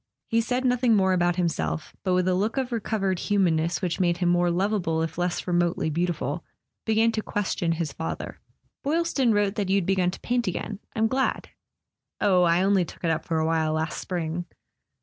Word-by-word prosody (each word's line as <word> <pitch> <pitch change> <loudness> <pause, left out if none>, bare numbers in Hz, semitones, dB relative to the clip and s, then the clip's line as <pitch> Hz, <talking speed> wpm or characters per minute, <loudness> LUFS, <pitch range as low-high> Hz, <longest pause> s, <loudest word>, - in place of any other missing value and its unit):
He 230 0 +3
said 250 +3 -1
nothing 250 -2 +3
more 190 -2 +3
about 175 -1 +2
himself, 170 -3 -2
but 185 -2 +1
with 180 0 +2
the 185 - +2
look 210 +7 0
of 260 -1 -1
recovered 200 -5 -1
humanness 175 -4 +1
which 175 0 -1
made 175 -2 +2
him 175 -1 +1
more 175 0 +3
lovable 175 -3 0
if 165 - -4
less 175 0 -1
remotely 175 -2 +1
beautiful, 165 -2 -2 0.4
began 220 +1 +3
to 220 - -2
question 190 -5 -1
his 160 -3 -3
father. 160 - -5 0.4
"Boylston 295 -4 +1
wrote 205 -2 +2
that 200 -3 -1
you'd 195 -2 +2
begun 185 -1 +2
to 180 - -6
paint 245 -1 0
again. 195 +3 -3 0.2
I'm 220 - +2
glad." 260 +4 0 0.7
"Oh, 185 -3 +4
I 175 +1 +3
only 195 -1 +3
took 170 - -11
it 165 - +2
up 160 0 -2
for 165 - -1
a 160 - +1
while 160 -1 +1
last 160 0 -2
spring." 175 -1 -3
185 Hz, 190 wpm, -26 LUFS, 170-215 Hz, 0.7 s, Oh